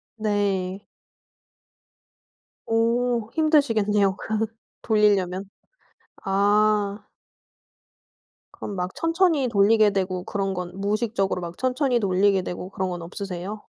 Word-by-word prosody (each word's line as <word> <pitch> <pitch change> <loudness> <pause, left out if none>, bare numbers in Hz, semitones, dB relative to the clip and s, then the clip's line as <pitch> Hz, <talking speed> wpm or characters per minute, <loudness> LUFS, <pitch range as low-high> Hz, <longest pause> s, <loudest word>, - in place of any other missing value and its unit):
네. 200 -3 -1 1.9
오. 230 0 +1
힘드시겠네요. 220 -11 +2
그 220 0 -1 0.4
돌리려면. 200 -3 +1 0.8
아. 205 +1 +2 1.5
그럼 205 - -7
막 180 0 -3
천천히 330 -5 +2
돌리게 215 0 +4
되고 185 -2 -2
그런 195 -1 -2
건 180 -1 -5
무의식적으로 205 -2 -1
막 170 0 -7
천천히 255 -1 +1
돌리게 195 -1 +2
되고 180 +1 -6
그런 190 -1 -3
건 175 -1 -5
없으세요? 195 +3 -6
205 Hz, 220 characters per minute, -24 LUFS, 190-225 Hz, 1.9 s, 돌리게